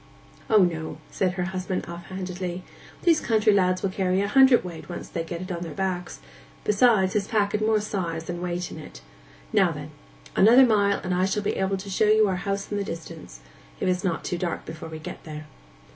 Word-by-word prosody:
'O 220 - +5
no,' 160 -3 -2
said 185 -2 0
her 180 0 -2
husband 185 0 -3
off 170 0 -8
handedly. 185 -1 -5 0.4
'These 330 -3 +4
country 220 -2 +3
lads 185 -2 +2
will 195 - 0
carry 185 -1 +1
a 200 - +1
hundredweight 235 -10 +3
once 175 - -6
they 165 - -3
get 170 +1 -5
it 185 - -7
on 170 -1 -4
their 165 -4 -6
backs; 185 -2 -3 0.4
besides 210 -3 +3
his 205 -2 0
pack 205 -2 +1
had 210 - -1
more 215 0 +3
size 175 -6 -3
than 175 +1 -5
weight 180 0 -3
in - - -8
it. - - -11 0.5
Now, - - +4
then, - - -7 0.4
another 240 +6 +7
mile 205 -4 +3
and 180 -1 -1
I 180 +1 +2
shall 200 +2 -1
be - - -1
able 190 0 0
to 190 +2 -9
show 200 +3 +2
you 215 0 +5
our 190 -2 0
house 195 +2 -3
in 205 - -1
the - - -1
distance—if - - -8
it - - +4
is 180 0 -2
not 175 -4 -1
too 175 - -3
dark 175 -1 -3
before 160 0 -8
we 160 - -7
get 155 - -8
there. 155 -1 -8
185 Hz, 215 wpm, -25 LUFS, 170-205 Hz, 0.5 s, another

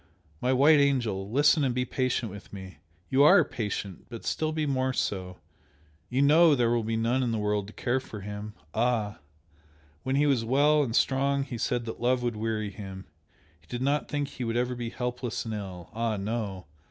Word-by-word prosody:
My 125 - +1
white 145 +4 +6
angel, 115 -9 +1
listen 145 +5 +4
and 130 -3 0
be 125 0 0
patient 125 -3 -1
with 100 0 -11
me! 95 -6 -9 0.3
You 135 - +4
ARE 145 - +7
patient 100 -5 -5
but 115 -2 -8
still 155 0 -1
be 155 -1 -1
more 130 -2 0
so! 90 -6 -2 0.7
you 130 +3 +2
know 155 +2 +6
there 120 -3 +2
will 120 -1 +1
be 110 +1 -1
none 120 +3 +1
in 120 -2 0
the 115 - -1
world 105 -1 -1
to 105 - -11
care 130 +1 0
for 110 -5 -9
him! 105 +1 -7 0.2
ah! 110 -3 0 0.8
when 130 +1 -1
he 145 +1 +3
was 135 -5 +2
well 145 +5 +3
and 120 -5 -1
strong 140 +1 +2
he 125 -4 -6
said 120 0 -1
that 115 - -7
love 125 +1 +2
would 120 -2 -1
weary 110 -1 -2
him 95 -1 -8 0.5
he - - -28
did 125 +1 -4
not 145 +2 +1
think 145 -1 -1
he 125 - -6
would 115 0 -1
ever 125 +1 0
be 120 -1 -4
helpless 125 -3 -3
and 110 - -4
ill! 95 -4 -7
ah, 115 -1 -1
no! 100 -2 -3
120 Hz, 200 wpm, -28 LUFS, 105-130 Hz, 0.8 s, ARE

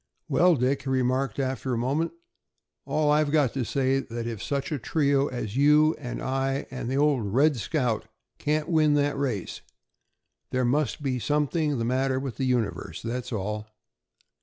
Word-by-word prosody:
"Well, 175 +1 +4
Dick," 130 +1 +1
he 135 - -5
remarked 130 -2 0
after 130 -1 -1
a - - -2
moment, 140 +8 0 0.7
"all 150 -1 +1
I've 150 0 +3
got 145 -5 +2
to 135 - -1
say 130 +2 0
is 135 0 0
that 115 -1 -5
if 115 -3 -4
such 140 0 -2
a 150 - -1
trio 140 +1 +1
as 115 -5 -5
you 150 +3 +5
and 125 -4 -5
I 135 +1 -1
and 125 -2 -4
the 135 - 0
old 140 -8 +2
'Red 145 +6 +4
Scout' 120 -4 -1 0.3
can't 150 +1 0
win 155 -3 +3
that 145 0 +1
race, 130 -9 -3 0.9
there 130 -1 0
must 135 0 0
be 130 -2 -1
something 150 +2 0
the 115 - -1
matter 130 +2 +1
with 135 -3 -5
the 135 - -1
universe, 100 -10 -1
that's 120 +2 -4
all." 105 0 -3
135 Hz, 175 wpm, -26 LUFS, 120-145 Hz, 0.9 s, you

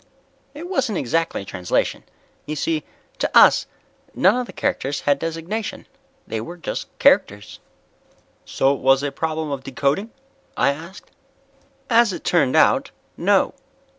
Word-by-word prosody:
"It 325 +4 -7
wasn't 265 - -1
exactly 165 -4 -1
translation. 90 -1 -1 0.4
You 155 - -3
see, 155 0 -1 0.4
to - - 0
us - - +6 0.5
none 190 +5 +4
of 250 -1 -2
the - - -9
characters 140 +1 -2
had 145 -1 +1
designation. 165 +7 -4 0.4
They 110 - -4
were 170 +10 -8
just 170 - -5
characters." 105 +1 +2 0.8
"So 135 +1 +1
it 140 - -5
was 135 +1 +3
a 145 - -1
problem 160 -1 -3
of 135 -2 -4
decoding?" 140 - -1 0.5
I 140 - +3
asked. 170 +6 -12 0.8
"As 230 -3 +4
it - - -7
turned 150 -7 +2
out, - - +4 0.3
no. - - +2
160 Hz, 135 wpm, -21 LUFS, 135-190 Hz, 0.8 s, us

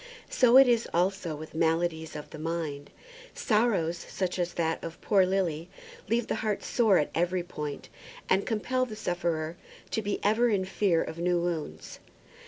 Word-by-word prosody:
So 250 0 +6
it 270 -1 +9
is 235 -1 +2
also 180 -2 0
with 155 +1 -9
maladies 160 0 0
of 150 - -8
the 155 - -8
mind. 155 -3 -4 0.5
Sorrows 210 -8 +1
such 185 -1 -2
as 175 0 -2
that 165 -1 -1
of 165 0 -7
poor 195 -3 +3
Lily's 175 -4 -1 0.4
leave 230 +1 +1
the - - -2
heart 215 -2 -1
sore 220 -6 +3
at 150 - 0
every 175 +1 0
point, 150 -5 -6 0.4
and 190 +1 +3
compel 255 +3 -1
the 215 - -7
sufferer 170 -4 -2 0.3
to 220 - 0
be 205 -1 -2
ever 220 +4 +3
in 195 -4 +1
fear 185 -3 +1
of 160 - -7
new 175 0 +2
wounds. 170 -3 -4
175 Hz, 170 wpm, -28 LUFS, 165-210 Hz, 0.5 s, it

